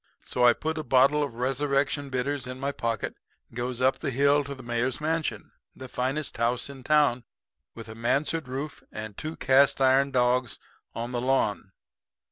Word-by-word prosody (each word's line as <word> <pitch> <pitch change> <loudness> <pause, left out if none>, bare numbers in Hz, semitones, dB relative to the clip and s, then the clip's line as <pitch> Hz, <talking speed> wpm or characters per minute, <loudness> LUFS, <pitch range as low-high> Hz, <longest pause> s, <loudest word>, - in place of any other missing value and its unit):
So 125 - -1
I 120 -1 +7
put 160 +4 -3
a - - -3
bottle 135 +3 +4
of 140 -5 -3
Resurrection 140 +3 0
Bitters 130 +1 -2
in 125 0 -7
my 140 +1 -1
pocket 115 -4 -3 0.4
and - - -19
goes 125 +1 -3
up 130 +1 +3
on - - -27
the - - -1
hill 140 +3 +3
to 140 +1 -6
the 130 - -12
mayor's 120 +2 -1
mansion, 160 +1 -2 0.2
the 130 - -9
finest 130 +4 -2
house 120 +3 0
in 135 -1 -11
town, 145 -3 +3 0.5
with 115 - -9
a 110 - -8
mansard 135 +7 0
roof 140 +4 -5
and 110 -1 -7
two 155 +7 -5
cast 135 +1 +4
iron 135 +1 +4
dogs 125 -2 +1 0.4
on 120 +1 -4
the 120 -1 -2
lawn. 110 -7 0
130 Hz, 185 wpm, -27 LUFS, 125-140 Hz, 0.5 s, I